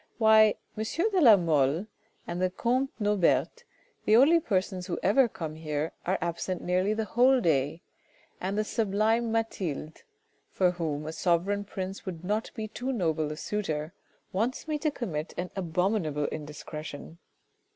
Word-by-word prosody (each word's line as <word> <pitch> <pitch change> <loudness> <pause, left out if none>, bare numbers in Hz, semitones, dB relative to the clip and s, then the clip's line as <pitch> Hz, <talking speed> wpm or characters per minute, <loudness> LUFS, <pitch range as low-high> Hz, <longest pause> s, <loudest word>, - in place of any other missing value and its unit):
Why! 220 -1 +6 0.2
M. 215 - -2 0.3
de 375 -3 +2
la 225 -8 +8
Mole 160 0 +2 0.4
and 175 +1 -4
the 185 - +2
comte 255 +8 0
Norbert, 210 - +1 0.4
the 215 - +5
only 295 +8 +6
persons 185 - -1
who 175 - -2
ever 240 +7 +5
come 160 -8 -6
here, 155 0 -3 0.2
are 190 +2 +2
absent 170 +2 -3
nearly 185 +4 +1
the 220 0 -1
whole 255 +4 +4
day, 155 - 0 0.6
and 195 +3 -2
the 215 - +2
sublime 220 +2 +1
Mathilde 185 -9 -3 0.5
for 180 -2 +2
whom 155 -4 -3
a 160 - -5
sovereign 185 +4 +1
prince 190 -1 -5
would 170 -2 -5
not 210 +4 -1
be 220 -1 -4
too 250 +5 -4
noble 160 - 0
a 155 - -6
suitor, 160 -6 -3 0.4
wants 230 +10 -1
me 305 -1 -1
to 305 - +1
commit 180 - -4
an 180 +1 -3
abominable 180 -4 0
indiscretion. 150 +1 -7
185 Hz, 150 wpm, -28 LUFS, 160-220 Hz, 0.6 s, la